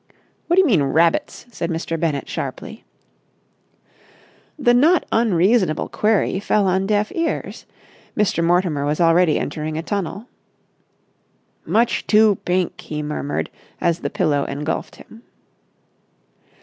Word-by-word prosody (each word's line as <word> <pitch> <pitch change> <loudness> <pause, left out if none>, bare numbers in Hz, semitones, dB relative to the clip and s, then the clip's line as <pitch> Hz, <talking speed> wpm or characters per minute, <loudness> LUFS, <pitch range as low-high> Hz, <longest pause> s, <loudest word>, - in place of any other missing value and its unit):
"What 345 - +2
do 380 - +6
you - - +1
mean, 205 - +3
rabbits?" 160 - +1
said 170 -6 -4
Mr. 165 0 -3
Bennett 155 -4 -1
sharply. - - -6 1.7
The 240 -5 +3
not 310 +8 +4
unreasonable 195 -5 +2
query 210 -3 +1
fell 205 0 +1
on 190 +1 +1
deaf 210 0 0
ears. 330 -1 -3 0.5
Mr. 200 -5 +1
Mortimer 170 -4 +1
was 150 +2 -1
already 170 -1 +4
entering 155 +1 -4
a 160 - -3
tunnel. 200 +3 -4 1.4
"Much 235 +2 +1
too 215 -2 +4
pink!" 180 0 -1
he 150 -1 -5
murmured 145 - -3 0.3
as 170 0 0
the - - -3
pillow 150 -6 0
engulfed 150 +3 -4
him. 225 - -15
180 Hz, 125 wpm, -20 LUFS, 155-215 Hz, 1.7 s, do